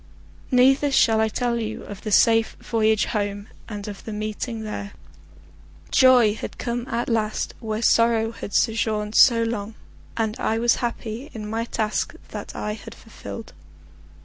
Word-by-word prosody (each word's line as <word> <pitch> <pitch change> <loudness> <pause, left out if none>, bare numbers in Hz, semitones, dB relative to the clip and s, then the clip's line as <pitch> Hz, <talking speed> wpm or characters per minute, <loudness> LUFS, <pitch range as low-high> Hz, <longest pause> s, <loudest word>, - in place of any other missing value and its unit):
Neither 270 +3 +4
shall 225 -4 +4
I 220 - +3
tell 235 +1 -1
you 220 -1 -4
of 200 -2 -9
the 215 - -4
safe 225 +2 +4
voyage 220 -2 +1
home, 205 -1 -3 0.2
and 205 -1 -6
of 205 -2 -8
the 220 - -7
meeting 215 +2 -4
there. 205 -1 -6 1.0
Joy 250 -5 +6
had 220 - -7
come 240 0 -3
at 235 +1 -2
last 220 -2 -1
where 220 -1 -3
sorrow 230 -1 +3
had 205 - -7
sojourned 215 -2 +1
so 230 -2 +6
long, 225 -1 -3 0.4
and 220 -1 0
I 225 - 0
was 235 +1 +3
happy 235 +2 -4
in 215 -1 -5
my 225 +2 -2
task 215 -2 -2
that - - -7
I 210 - -3
had 225 +1 -10
fulfilled. 225 0 -10
225 Hz, 155 wpm, -23 LUFS, 215-235 Hz, 1.0 s, Joy